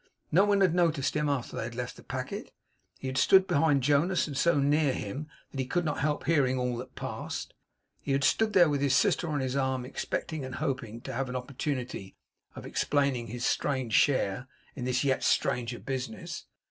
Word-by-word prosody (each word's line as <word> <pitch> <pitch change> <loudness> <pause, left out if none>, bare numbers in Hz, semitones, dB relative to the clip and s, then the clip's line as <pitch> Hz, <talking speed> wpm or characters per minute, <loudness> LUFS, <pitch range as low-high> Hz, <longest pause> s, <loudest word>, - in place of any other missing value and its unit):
No 190 +6 +5
one 200 -1 +3
had 185 -4 +4
noticed 165 -6 +1
him 150 -1 +1
after 140 -4 -2
they - - -2
had 120 0 -7
left 125 -1 -4
the - - -13
packet. - - -5 0.5
He - - -9
had 130 0 -1
stood 190 +7 +6
behind 155 -6 +2
Jonas, 150 +6 +3
and 145 - -6
so 160 +2 +3
near 145 0 +3
him, 130 +10 -5 0.2
that 135 - -6
he 130 - 0
could 175 +5 0
not 150 - -1
help 150 +1 0
hearing 135 -6 +3
all 125 -1 -1
that 125 - -8
passed. - - -5 0.5
He 140 - -3
had 135 0 +1
stood 215 +9 +3
there, 180 -4 +7
with 145 -2 0
his 140 -2 +3
sister 175 0 +2
on 145 -2 -1
his 130 0 -2
arm, 130 -2 0
expecting 150 +3 -3
and 130 0 -6
hoping 130 -6 -3
to 135 - -6
have 130 +2 -2
an 125 - -5
opportunity 125 -5 -4 0.4
of - - -8
explaining 140 -5 0
his 120 +2 -4
strange 130 -6 0
share 125 -2 +2 0.3
in 125 - -4
this 125 +1 +1
yet 135 -2 +1
stranger 120 0 +1
business. 130 -5 -5
135 Hz, 200 wpm, -29 LUFS, 125-150 Hz, 0.5 s, there